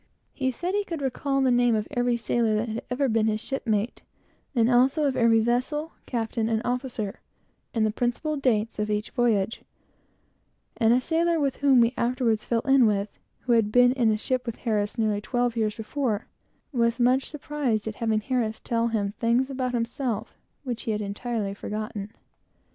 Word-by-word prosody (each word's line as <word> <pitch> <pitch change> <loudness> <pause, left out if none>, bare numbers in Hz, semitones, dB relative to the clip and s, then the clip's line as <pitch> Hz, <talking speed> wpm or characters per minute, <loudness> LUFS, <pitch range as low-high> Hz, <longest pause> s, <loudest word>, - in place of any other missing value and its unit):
He 265 - -2
knew - - +2 0.3
the 275 -5 0
name 245 -1 +3
of 215 -1 -1
every 245 -1 +1
sailor 230 -1 +1
that 215 +2 0
had 220 +2 -3
ever 265 +3 +1
been 225 -2 +2
his 215 -1 0
shipmate, 225 -4 -2 0.5
and 230 -2 +4
also, 260 +5 +3
of 270 -2 +1
every 230 -1 +4
vessel, 255 +7 0 0.2
captain, 225 -2 -1
and 220 -1 +1
officer, 245 -5 -3 0.5
and 225 -3 +1
the 215 - +1
principal 245 +7 -1
dates 230 -6 0
of 210 0 -1
each 210 0 -2
voyage; 225 -4 +1 1.2
and 225 -3 +4
a 245 - +5
sailor 330 +1 +1
whom 265 -3 +4
he 230 +2 +1
afterwards 235 -3 0
fell 230 -1 +1
in 270 -3 +5
with, 205 -1 0 0.3
who 250 - -2
had 225 -3 +3
been 245 +1 +6
in 245 -3 +2
a 215 - +1
ship 255 +3 -2
with 230 - -3
Harris 210 -2 -1
nearly 215 -2 +1
twelve 245 +2 0
years 215 -2 0
before, 225 -1 -2 0.5
was 235 -1 +2
very 240 - +3
much 260 +2 +2
surprised 280 -7 -2
at 220 - -2
having 220 -2 +1
Harris 230 -2 -1
tell 230 0 0
him 210 -3 -1
things 245 +3 +2
about 255 -2 -2
himself 235 -1 -2 0.3
which 245 -4 -4
he 225 - -2
had 210 - -2
entirely 205 0 -3
forgotten. 210 0 -5
235 Hz, 175 wpm, -26 LUFS, 220-255 Hz, 1.2 s, been